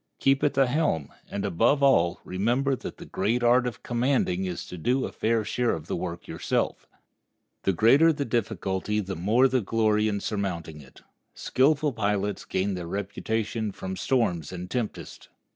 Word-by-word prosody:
Keep 135 0 +2
at 145 - +2
the 135 - +5
helm, 125 - 0 0.2
and, 100 - -3
above 115 - +2
all, 90 -11 +3
remember 120 +9 0
that - - -8
the - - -10
great 115 +6 -1
art 125 +1 +4
of 120 - -6
commanding 120 -7 0
is 90 -2 -4
to - - -8
do 125 +11 0
a - - -5
fair 110 -1 0
share 120 +3 0
of 80 - -8
the - - -3
work - - -5
yourself. - - -2 0.8
The 95 - +3
greater 135 - +5
the 145 -2 -2
difficulty 105 -3 -1
the 95 -2 -4
more 110 +10 +3
the 130 -1 +1
glory 110 0 +2
in 100 -1 -1
surmounting 90 -8 -4
it. 65 - -17 0.3
Skillful 145 +2 +2
pilots 105 -2 -1
gain 95 +2 -1
their 90 -2 -5
reputation 105 +3 -2
from 95 -1 -6
storms 90 - 0
and 90 0 -7
tempests. 120 -4 -4
110 Hz, 170 wpm, -26 LUFS, 95-125 Hz, 0.8 s, the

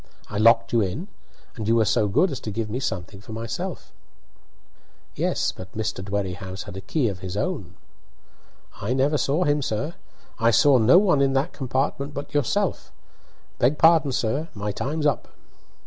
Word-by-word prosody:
I 105 - -2
locked 115 +1 +4
you 115 - +4
in, 135 - -3 0.5
and 110 -3 -5
you 115 - +4
were 115 -1 +4
so 105 +1 +2
good 165 - +2
as 135 - -4
to - - -6
give 105 +1 -3
me 125 - -2
something 100 -5 -4
for 110 - -10
myself." 115 0 -5 1.2
"Yes; - - 0
but 95 0 -11
Mr. 105 -3 -3
Dwerrihouse 95 -1 -4
had - - -9
a 95 - -6
key 125 +7 0
of 95 -3 -4
his 95 +1 -5
own." 105 - -3 1.1
"I 105 +5 -1
never 140 +3 +2
saw 150 +6 +1
him, 145 -2 +2
sir; 135 +6 -2 0.5
I 115 0 +4
saw 135 +2 +5
no 120 +9 +6
one 180 -8 +4
in 135 -1 +3
that 135 +6 0
compartment 140 +2 -2
but 145 - -6
yourself. 145 -5 0 0.7
Beg 135 +5 +3
pardon, 160 -3 +5
sir; 135 +7 -1
my 105 0 -3
time's 150 +9 -3
up." 145 - +1
115 Hz, 175 wpm, -24 LUFS, 105-145 Hz, 1.2 s, no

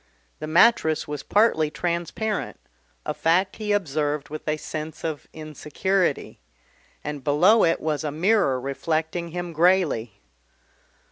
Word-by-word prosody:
The 155 - -5
mattress 160 -1 +3
was 150 -1 -4
partly 205 -8 +2
transparent, 175 +6 -3 0.5
a - - -2
fact 180 +4 +1
he 215 -1 -3
observed 150 -6 -1
with 155 +1 -8
a 155 0 0
sense 155 0 -7
of 155 -3 -4
insecurity, 160 +5 -2 0.6
and 150 -2 -5
below 175 - +4
it 165 - +2
was 155 -1 -2
a 150 - -1
mirror 165 -3 +2
reflecting 160 +5 -2
him 175 0 -5
greyly. 160 - +2
160 Hz, 125 wpm, -24 LUFS, 150-185 Hz, 0.6 s, below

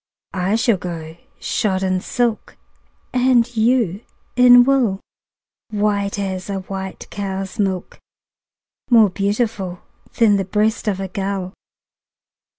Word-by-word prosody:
I 190 +3 0
shall 230 -2 +2
go 165 -3 -7 0.2
shod 190 -3 -1
in 185 -1 0
silk, 240 -1 -2 0.6
And 250 -1 +3
you 220 -4 +2 0.3
in 245 0 +8
wool, 245 -7 +2 0.7
White 205 -1 0
as 190 -1 -4
a 195 -1 -2
white 190 0 -7
cow's 195 -1 -5
milk, 190 -3 -2 0.9
More 225 -5 +6
beautiful 200 -2 -2 0.3
Than 215 -3 +5
the 195 - 0
breast 215 +4 0
of 195 -2 0
a 195 - -3
gull. 195 -1 -3
200 Hz, 115 wpm, -20 LUFS, 190-225 Hz, 0.9 s, in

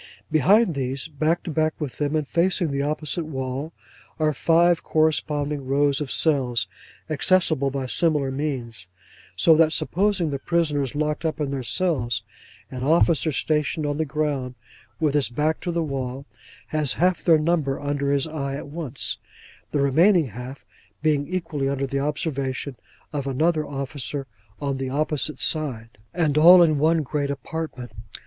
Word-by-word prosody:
Behind 185 - +4
these, 135 +1 -3
back 155 +2 0
to 170 - -5
back 155 0 0
with 145 -5 -5
them 145 +1 0
and 155 -2 -1
facing 170 0 +1
the 140 0 -1
opposite 155 +3 -2
wall, 135 +1 -4 0.5
are 155 -1 +1
five 170 +4 +3
corresponding 150 -3 0
rows 140 +1 +2
of 145 - -4
cells, 130 -8 +2 0.4
accessible 155 -2 +2
by 135 -1 -3
similar 145 -1 +1
means: 125 -8 -4 0.5
so 165 - +5
that 160 -1 +4
supposing 185 -1 +1
the 140 - -3
prisoners 150 -5 0
locked 150 +1 -1
up 160 -1 -2
in 145 -2 -2
their 135 -1 -2
cells, 125 - 0 0.5
an 130 -1 -5
officer 160 +1 +3
stationed 150 +2 0
on 145 0 -1
the 160 - +1
ground, 140 -4 -2 0.4
with 155 -3 +1
his 145 -5 +2
back 150 +6 0
to 175 - -3
the 170 -1 0
wall, 135 -2 -4 0.4
has 150 -4 +1
half 180 +1 +1
their 165 -2 +5
number 150 -3 0
under 145 -1 -1
his 140 -1 +2
eye 140 -4 -4
at 140 - -7
once; 155 -4 -3 0.5
the - - -1
remaining 160 +3 +4
half 125 +5 -9 0.4
being 145 -2 +1
equally 165 -6 -2
under 140 0 -1
the 140 +1 -2
observation 140 -2 -3 0.4
of 140 -2 -3
another 155 +3 +1
officer 140 0 -4 0.3
on 140 -2 -2
the 135 -1 -3
opposite 150 +2 -1
side; 120 -9 -1
and 155 -2 +1
all 175 +3 +9
in 155 -3 +2
one 160 +1 +3
great 145 +1 -2
apartment. 140 -3 -5
150 Hz, 155 wpm, -24 LUFS, 135-160 Hz, 0.5 s, all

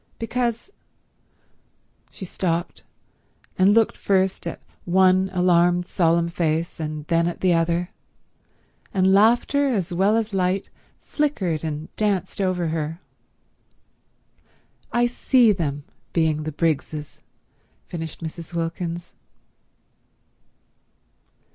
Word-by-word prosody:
Because—" 235 - -2 1.4
She 190 - -8
stopped, 175 -1 -2 0.8
and 190 +2 +6
looked 225 +1 +3
first 190 -1 0
at - - -5 0.2
one 185 +1 +3
alarmed 175 -1 +3
solemn 170 -1 +2
face 165 0 -1
and 155 -1 -4
then 165 +1 +2
at 175 - -4
the 185 -2 +3
other, 170 +1 0 1.0
and 190 0 +4
laughter 240 +7 +4
as 195 -10 -1
well 195 +5 +3
as 220 -2 -2
light 185 0 0 0.3
flickered 195 - -1
and 155 -1 -5
danced 200 -1 -1
over 180 -3 0
her. 160 +1 -3 1.9
"I 240 0 +3
see 240 -1 +3
them 145 -7 -2 0.3
being 155 -2 +1
the 155 - -3
Briggses," 150 -1 -2 0.6
finished 165 -1 -7
Mrs. 165 +1 -7
Wilkins. 170 +1 -4
175 Hz, 100 wpm, -23 LUFS, 165-195 Hz, 1.9 s, and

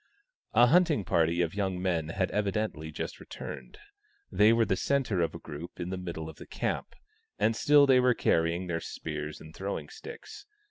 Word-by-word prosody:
A 120 +2 +8
hunting 155 - +4
party 85 0 +2
of 80 - -3
young 95 -3 -1
men 85 -4 -1
had 95 +2 -1
evidently 100 -6 -1
just 75 - -5
returned; - - -8 0.5
they 105 +2 +5
were 115 0 +4
the 100 -2 +1
centre 125 -4 0
of 85 - -1
a - - -6
group 80 +3 -9
in 90 +1 -4
the - - -1
middle 85 -3 -5
of 80 - -10
the - - -11
camp, - - -3 0.4
and 110 +2 +2
still 145 +4 +6
they 130 -2 +5
were 125 -1 +4
carrying 85 +2 +1
their 85 -2 -2
spears 75 -1 -5
and 80 0 -13
throwing 100 +1 -4
sticks. 445 -1 -10
95 Hz, 185 wpm, -29 LUFS, 85-115 Hz, 0.5 s, A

